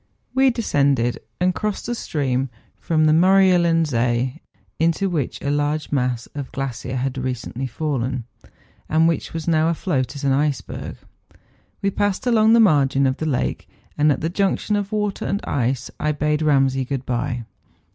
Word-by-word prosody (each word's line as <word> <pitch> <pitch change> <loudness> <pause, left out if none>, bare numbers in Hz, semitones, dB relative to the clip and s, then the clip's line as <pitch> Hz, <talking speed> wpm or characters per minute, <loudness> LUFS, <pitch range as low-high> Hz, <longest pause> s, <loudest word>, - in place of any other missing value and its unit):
We 265 +1 +4
descended, 140 - +1 0.2
and 180 +1 +2
crossed 210 +1 -3
the 240 - -2
stream 135 - -1
which 120 -4 -11
flows 155 -2 +3
from - - +5
the 155 - +5
iMdrjelen 175 -2 +4
See, 125 -1 0 0.4
into 170 +4 +1
which 150 -7 -2
a 140 - 0
large 145 +1 -1
mass 125 -4 0
of 140 -2 -4
the - - -25
glacier 130 -1 -4
liad 130 0 -2
recently 130 0 -3
fallen, 130 -2 -2 0.7
and 160 +1 +4
which 165 - -1
was 165 0 -5
now 160 -1 +3
afloat 155 -6 -1
as 140 - -7
an 140 - +2
iceberg. 145 0 -2 0.9
We 200 - +2
passed 205 +1 -1
along 225 -2 +4
the 230 - +6
margin 140 -9 +4
of 130 +1 +1
the 160 - -3
lake, 130 -4 -2 0.3
and 150 0 +3
at 135 - -1
the 160 - 0
junction 200 +3 0
of 205 0 -2
water 210 -2 -1
and 200 - -1
ice 130 0 -1
I 150 0 0
bade 150 +1 0
Eamsay 135 -4 +2
good 135 -1 -3
bye. 120 -1 -2
150 Hz, 175 wpm, -22 LUFS, 130-175 Hz, 0.9 s, the